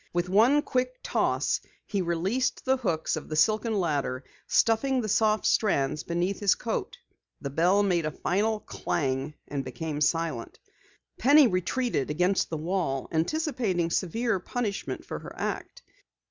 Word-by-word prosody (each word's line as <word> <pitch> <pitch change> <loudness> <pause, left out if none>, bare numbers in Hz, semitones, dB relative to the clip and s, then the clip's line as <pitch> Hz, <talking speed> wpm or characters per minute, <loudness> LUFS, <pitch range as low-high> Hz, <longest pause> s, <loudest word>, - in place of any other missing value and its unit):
With 175 +1 0
one 240 +10 +5
quick 255 -1 -1
toss - - 0 0.2
he 200 -3 -1
released 185 +9 -1
the 265 0 +3
hooks 170 -11 -1
of - - -7
the 155 - -3
silken 215 +6 +2
ladder, 140 -6 -1 0.2
stuffing 255 +4 +2
the 225 - -2
soft 215 +1 +2
strands 150 -8 +2
beneath 175 +4 -1
his 205 -3 +3
coat. 230 - -3 0.4
The 140 - -5
bell 180 +7 +3
made 175 -5 +1
a - - 0
final 210 +7 0
clang 135 -1 -2
and 140 -1 -3
became 145 +4 -5
silent. 160 -6 0 0.6
Penny 285 +4 +7
retreated 185 - 0
against 180 +5 +1
the 160 - -3
wall, 160 -5 -2
anticipating 190 - 0
severe 220 +4 0
punishment 200 - -4
for - - -5
her - - -10
act. - - -4
185 Hz, 145 wpm, -27 LUFS, 155-225 Hz, 0.6 s, Penny